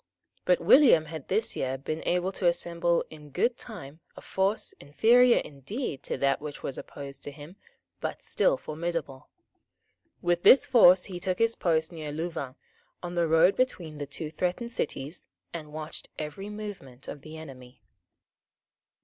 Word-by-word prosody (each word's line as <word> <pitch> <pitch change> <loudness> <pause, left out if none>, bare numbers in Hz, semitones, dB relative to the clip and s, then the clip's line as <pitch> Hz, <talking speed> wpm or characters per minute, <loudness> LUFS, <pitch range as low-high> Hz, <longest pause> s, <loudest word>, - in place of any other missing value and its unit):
But - - +4
William 245 - +6
had 155 -2 -8
this 215 +4 0
year 130 0 -2
been 155 +4 -4
able 180 +1 +1
to 185 -2 0
assemble 170 0 +1
in 150 -1 -12
good 235 - +1
time 160 - -10 0.2
a - - -9
force, 195 +2 -1
inferior 235 - +5
indeed 145 - -4
to - - -2
that 140 0 +1
which 150 -1 -7
was 135 - -3
opposed 140 -1 -8
to 145 - -6
him, 150 +5 -12 0.4
but - - -4
still - - +2
formidable. 155 - -5 0.9
With 175 0 +1
this 265 - +7
force 185 -8 +7
he 180 -3 -6
took 180 +1 -1
his 230 0 +2
post 160 -2 +1
near 155 -3 -6
Louvain, 160 -4 -4 0.5
on 175 0 -5
the 170 -1 +1
road 165 +4 +5
between 170 -12 -1
the 145 - -4
two 150 +2 -6
threatened 185 +8 -2
cities, 145 -1 -4 0.3
and 155 -3 -7
watched 155 0 -7
every 155 +7 -6
movement 205 -12 -8
of 145 - -7
the 155 +2 -10
enemy. 130 -5 -12
165 Hz, 160 wpm, -28 LUFS, 145-190 Hz, 0.9 s, this